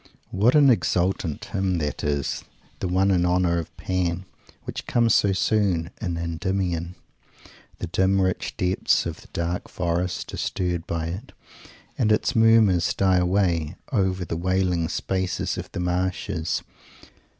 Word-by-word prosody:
What 110 +8 +3
an 145 -3 +7
exultant 90 -5 0
hymn 95 -2 -1
that 75 -3 -3
is, 70 -2 -1 0.4
the - - -2
one 95 +2 +2
in 90 -2 +3
honour 90 -1 +2
of 85 0 -8
Pan, 90 -1 -1 0.4
which - - -6
comes 115 -2 +3
so 100 - +4
soon 95 -3 +1
in 90 -5 -2
Endymion! 85 0 -2 0.8
The - - -4
dim 95 +3 +2
rich 95 -1 -1
depths 90 +1 +1
of - - -5
the - - -16
dark 85 +1 -3
forests 90 0 -2
are - - -4
stirred 90 -2 -2
by 85 -1 -2
it, 100 +10 -7 0.7
and 110 -3 +3
its 105 - +1
murmurs 110 -6 +4
die 95 -1 +3
away, 90 -3 +1 0.2
over 95 -6 +1
the 80 - -3
wailing 90 -2 +1
spaces 95 -1 -1
of - - -7
the - - -5
marshes. 90 -1 -1
90 Hz, 145 wpm, -24 LUFS, 85-95 Hz, 0.8 s, an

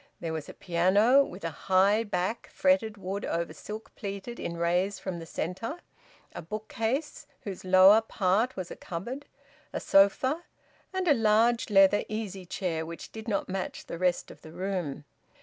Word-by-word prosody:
There 165 -1 -4
was 155 -2 -5
a - - -10
piano, 200 +10 +4
with 185 -7 -9
a 165 - -2
high 195 +7 +3
back 205 +1 -2
fretted 270 -7 +2
wood 195 +1 -4
over 170 -1 -2
silk 210 +8 -8
pleated 200 +3 -6
in 170 - -4
rays 180 +4 +1
from 185 -3 -5
the 165 - -9
centre; 190 - -4 0.6
a - - -6
bookcase 220 - -3
whose 195 -3 -7
lower 190 +3 +7
part 220 +3 +1
was 185 -2 -5
a - - -6
cupboard; 235 +12 -6 0.4
a - - -3
sofa; 260 +10 +3 0.5
and 375 -1 -2
a 300 - +7
large 225 0 +3
leather 195 0 +5
easy 200 -4 -5
chair 170 -4 -2
which 165 +1 -8
did 220 +1 -9
not 200 -3 -1
match 190 0 -4
the 170 - -6
rest 180 -1 0
of - - -15
the 155 - -12
room. 175 -5 -3
195 Hz, 165 wpm, -28 LUFS, 180-220 Hz, 0.6 s, lower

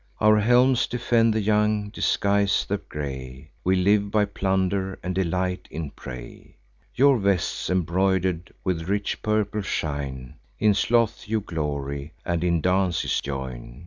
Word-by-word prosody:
Our 110 0 +5
helms 125 +3 +4
defend 115 -1 +2
the 110 0 0
young, 105 0 +1
disguise 100 -1 +1
the - - 0
gray: 65 0 -7
We 95 +1 +3
live 100 +2 +3
by 105 0 +2
plunder, 95 -1 -1
and 90 - -2
delight 90 0 -1
in 75 -2 -5
prey. 60 -3 -10 0.4
Your 135 -1 +5
vests 100 -3 0
embroider'd 90 -1 0
with 90 -2 -2
rich 100 0 -1
purple 105 -1 0
shine; 70 -8 -4 0.2
In 105 -1 +4
sloth 115 +2 +1
you 110 +1 +1
glory, 70 -4 -4
and 85 -1 -1
in 85 -2 +1
dances 90 -1 +1
join. 65 -3 -6
95 Hz, 135 wpm, -25 LUFS, 80-105 Hz, 0.4 s, Our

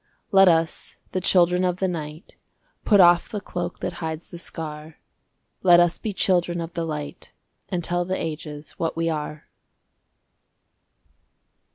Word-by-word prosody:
Let 195 -1 +7
us, 165 -1 +1
the 185 - -1
Children 180 0 +3
of 180 -1 0
the 190 - 0
Night, 155 0 -6 0.5
Put 205 -3 +4
off 175 -1 +6
the 210 - -4
cloak 175 -2 -5
that 180 - -3
hides 160 0 -5
the 175 - -8
scar! 155 -2 -7 0.6
Let 175 -2 +7
us 175 -1 +2
be 220 - -3
Children 175 -3 +1
of 165 0 -5
the 170 -1 -2
Light, 150 -2 -6 0.4
And 175 -2 -2
tell 175 +2 0
the 185 +1 -2
ages 150 -1 -6
what 165 0 -2
we 165 0 +1
are! 150 0 -5
175 Hz, 150 wpm, -24 LUFS, 160-180 Hz, 0.6 s, Let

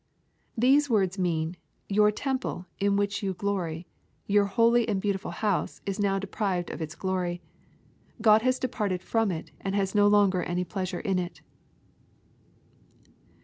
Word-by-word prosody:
\ - - -43
These 275 +5 +4
words 195 -4 +1
mean, 170 -1 -1 0.3
"Your 210 +1 +4
temple, 260 -4 -3
in 200 0 +2
which 200 0 0
you 190 -2 -2
glory, 180 -4 -2 0.4
your 205 0 +3
holy 230 +3 +3
and 200 -3 +1
beautiful 200 0 -2
house, 205 -4 -1
is 195 +1 -3
now 195 -1 +2
deprived 195 -2 -2
of - - -7
its 155 -1 -5
glory. 180 -2 -2 0.8
God 215 -1 +6
has 255 +2 +2
departed 210 -8 -2
from 225 -2 +1
it, 160 -3 -5
and 195 0 -2
has 195 -1 0
no 205 0 +5
longer 200 -3 +4
any 175 +1 -1
pleasure 185 0 -4
in 195 -4 0
it." 175 -1 -5
200 Hz, 150 wpm, -27 LUFS, 180-210 Hz, 0.8 s, God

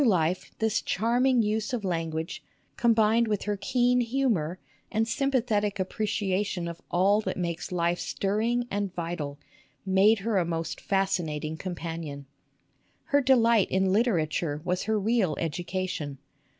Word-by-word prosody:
Through 275 - +4
life 180 -2 +1
this 220 -1 +1
charming 240 +3 +2
use 215 +2 -1
of 235 -4 -2
language, 165 -2 -3 0.3
combined 230 0 +3
with 210 -2 -1
her 205 0 -1
keen 245 +4 +2
humor 230 - 0 0.3
and 225 +1 +1
sympathetic 235 -6 0
appreciation 190 -2 -1
of 170 0 -7
all 195 +4 +3
that - - -3
makes 170 -2 -3
life 175 0 0
stirring 225 +5 0
and 200 -1 -1
vital, 165 -4 -4 0.5
made 195 +4 +5
her 220 -4 +2
a - - +2
most 165 -1 -3
fascinating 160 -6 -1
companion. 165 -5 -5 0.8
Her 285 0 +2
delight 235 -5 +4
in 190 0 +2
literature 165 -8 +1
was 180 0 -1
her 220 0 +1
real 205 -7 +1
education. 170 -3 -3
195 Hz, 135 wpm, -27 LUFS, 170-225 Hz, 0.8 s, made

